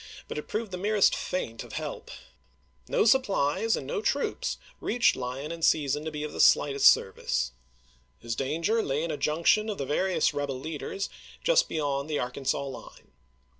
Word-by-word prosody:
towards - - -13
him, - - -21
bnt - - -7
it - - -9
proved 215 -2 -3
the 180 - -4
merest 205 +1 +3
feint 115 -11 -4
of - - -12
help. - - -5 0.8
No - - +2
supplies 220 - +2
and - - -6
no 145 - -2
troops 280 +6 -1 0.2
reached 240 +2 +2
Lyon 130 +4 -5
in 170 0 -7
season 150 -2 +2
to 160 - -3
be 150 0 -4
of 150 - -5
the - - -7
slightest 140 -1 +5
service. 65 -9 +2 0.7
His 115 -1 -4
danger 165 - 0
lay 145 -3 -1
in 165 - -2
a 150 - -3
junction 170 +9 +2
of 205 - -3
the 140 - -3
various 160 +3 +1
rebel 140 -2 -3
leaders 160 +6 -4 0.4
just - - +3
beyond 145 -2 -2
the 150 - 0
Arkansas 135 +2 -2
line. 135 -2 -10
150 Hz, 180 wpm, -28 LUFS, 140-195 Hz, 0.8 s, slightest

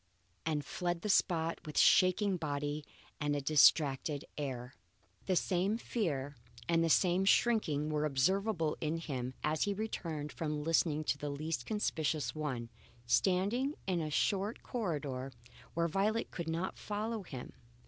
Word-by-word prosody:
and 150 -2 0
fled 175 -1 -2
the 210 - -2
spot 165 -3 +2
with 150 -3 -7
shaking 185 +1 +5
body 145 -2 -2 0.4
and 145 -1 0
a - - 0
distracted 145 0 +4
air. 130 -3 -4 0.5
The 185 - +2
same 185 +5 +1
fear 145 - -2 0.3
and 165 -1 +3
the 165 - +2
same 180 +3 +4
shrinking 195 -8 +2
were 150 0 0
observable 165 +4 +1
in 160 +1 0
him 130 -6 -4
as 155 0 +1
he 200 -1 -1
returned 165 -8 -4
from 150 -2 -3
listening 155 -1 +2
to 145 - -1
the 145 - -3
least 145 -2 -3
conspicuous 160 -8 -1
one, 130 -7 -4 0.3
standing 200 - +2
in 180 -3 0
a 155 - -2
short 200 +7 0
corridor, 145 - -3 0.4
where 170 0 +2
Violet 205 +6 0
could 170 -2 -4
not 170 +3 -2
follow 215 +2 -3
him. 135 -9 -8
160 Hz, 145 wpm, -34 LUFS, 145-190 Hz, 0.5 s, shaking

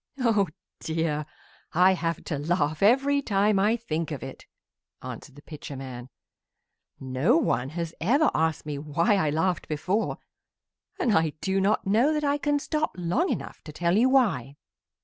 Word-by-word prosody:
"Oh 225 -6 +2 0.3
dear! 160 -2 -2 0.5
I 180 +3 +5
have 170 -2 -2
to 150 -4 -3
laugh 155 -1 0
every 275 +7 +4
time 205 -3 +2
I 215 +4 +3
think 165 -8 -3
of 150 -5 -5
it," - - -9 0.6
answered - - -8
the 145 - -14
Pitcher 150 -2 -8
man. 130 -2 -8 0.9
"No 135 - +2
one 130 - 0
has 165 +1 -4
ever 275 - +3
asked 160 -1 0
me 145 -2 -4
why 155 +6 +1
I 155 -6 +1
laughed 160 +3 0
before, 185 +8 -1 0.8
and 230 -4 +2
I 160 -2 +2
do 190 0 0
not 205 +3 +1
know 235 +10 +3
that 300 - -1
I 285 0 +1
can 290 0 +1
stop 305 +1 -2
long 180 - 0
enough - - -5
to 155 - -9
tell 170 +3 0
you 240 +5 +4
why." 170 - +2
175 Hz, 165 wpm, -26 LUFS, 150-230 Hz, 0.9 s, I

